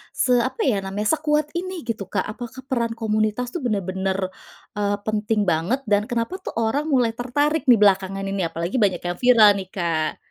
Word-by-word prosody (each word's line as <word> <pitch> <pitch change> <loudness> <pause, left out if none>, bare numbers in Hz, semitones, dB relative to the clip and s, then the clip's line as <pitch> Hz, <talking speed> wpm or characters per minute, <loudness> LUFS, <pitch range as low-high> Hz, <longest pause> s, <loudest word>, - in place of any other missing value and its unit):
se 255 - +1
apa 260 - -1
ya 235 -8 +2
namanya, 210 +10 -1
sekuat 300 0 0
ini 360 -1 -4
gitu, 215 -5 -4
Kak? - - 0
Apakah 240 +4 -8
peran 235 -4 -1
komunitas 215 +2 -1
tuh 350 - -2
bener-bener, 190 -5 -1 0.6
eee, 205 0 0
penting 215 0 0
banget? 180 +10 0
Dan 210 -1 +1
kenapa 240 +11 -2
tuh - - -7
orang 230 +7 0
mulai 250 -5 +3
tertarik 290 +6 0
dibelakangan 195 -4 +4
ini? 195 0 -2
Apalagi 170 +8 -3
banyak 190 -4 +1
yang 175 0 -3
viral 235 -4 +7
nih, 190 - -7
Kak. 165 -4 -1
220 Hz, 175 wpm, -22 LUFS, 195-255 Hz, 0.6 s, viral